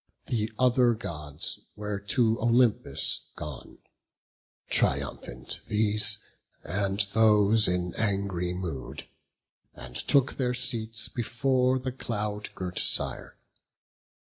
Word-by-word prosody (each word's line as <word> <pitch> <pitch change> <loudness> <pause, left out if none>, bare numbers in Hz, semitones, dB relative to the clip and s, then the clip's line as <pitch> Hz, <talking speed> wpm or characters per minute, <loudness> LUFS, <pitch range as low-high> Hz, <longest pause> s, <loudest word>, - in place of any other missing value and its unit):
The 110 -2 -1
other 125 -2 +4
Gods 75 -8 -4 0.2
were 105 -1 -4
to 110 +2 +1
Olympus 120 0 +2
gone, 75 -3 -8 0.9
Triumphant - - -1
these, 105 0 +3 0.5
and 100 +3 0
those 110 -1 +5
in 90 -1 -1
angry 100 -4 -1
mood, 90 -7 -6 0.7
And - - -11
took 140 -1 +2
their 125 -2 0
seats 115 -3 -3
before 125 +2 0
the 130 0 -4
cloud 105 -4 -4
girt 90 -1 -4
Sire. - - +1
105 Hz, 95 wpm, -27 LUFS, 95-120 Hz, 0.9 s, those